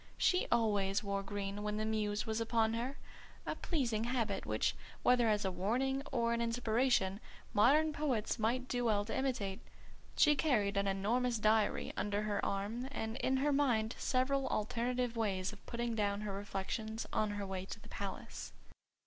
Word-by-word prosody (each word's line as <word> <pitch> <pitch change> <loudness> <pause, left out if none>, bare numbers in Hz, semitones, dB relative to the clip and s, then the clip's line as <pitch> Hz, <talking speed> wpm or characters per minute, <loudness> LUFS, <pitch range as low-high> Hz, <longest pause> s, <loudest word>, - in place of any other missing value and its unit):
She 365 - +3
always 205 -4 +2
wore 200 -1 -1
green 200 0 -4
when 210 0 -2
the 215 - -1
Muse 210 -1 0
was 220 0 -1
upon 225 -1 +2
her: 245 +4 -3 0.5
a - - -1
pleasing 235 -9 -1
habit 230 -5 -1
which, - - +1 0.3
whether 245 -2 +5
as 210 -1 +1
a 190 - +1
warning 255 +9 0
or 235 -1 +1
an 235 - 0
inspiration, 230 -3 +1 0.3
modern 300 +9 +5
poets 255 -7 -1
might 245 +4 0
do 245 -1 -1
well 205 -3 +2
to 225 - -3
imitate. 225 -7 -1 0.6
She 295 -1 +6
carried 220 -10 +2
an 200 0 +1
enormous 230 +5 +1
diary 215 0 +2
under 205 0 -1
her 210 -1 -1
arm; 210 +6 -2
and 220 -4 -3
in 265 0 +1
her 290 +2 +2
mind 240 -6 +2
several 270 +1 +1
alternative 240 +3 -1
ways 200 -3 -1
of 205 - -14
putting 235 -1 -2
down 205 -2 0
her 210 -2 -3
reflections 205 +3 -3
on 215 - +1
her 205 -1 -3
way 190 -1 -4
to 220 - -7
the - - -15
Palace. 200 -1 -6
220 Hz, 170 wpm, -35 LUFS, 205-245 Hz, 0.6 s, She